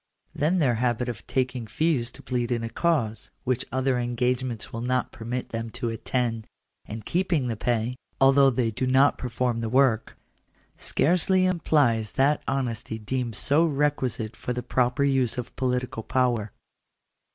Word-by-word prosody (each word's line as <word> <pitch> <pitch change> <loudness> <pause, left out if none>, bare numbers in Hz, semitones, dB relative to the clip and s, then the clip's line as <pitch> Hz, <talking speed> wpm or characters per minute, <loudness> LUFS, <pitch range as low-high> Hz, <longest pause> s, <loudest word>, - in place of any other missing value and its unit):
Then 160 +6 +1
their 140 -8 +3
habit 125 0 0
of 110 -6 -7
taking 130 -3 -1
fees 145 -4 0
to - - -13
plead 120 -1 -2
in 115 -1 0
a 115 - -4
cause, 135 -11 0
which 130 0 0
other 130 -1 +1
engagements 120 -1 -1
will 115 - -4
not 125 +1 0
permit 125 +1 -5
them 115 0 -4
to 120 -2 -2
attend, 115 0 -2 0.4
and 110 0 -7
keeping 170 -7 0
the 115 - -1
pay, 120 +2 -1 0.2
although 135 0 +6
they 120 -2 0
do 130 +4 -2
not 135 +2 +4
perform 125 -1 -1
the 115 - -2
work, 130 -3 +2 0.6
scarcely 185 +3 +2
implies 145 - +2
that 140 +3 +2
honesty 115 -4 -2
deemed 120 +1 -3
so 145 +10 +2
requisite 140 -7 0
for 125 - -4
the 125 0 -4
proper 125 +2 +1
use 135 -4 +1
of 125 - -5
political 125 -3 -1
power. 120 -4 0
125 Hz, 155 wpm, -26 LUFS, 115-135 Hz, 0.6 s, although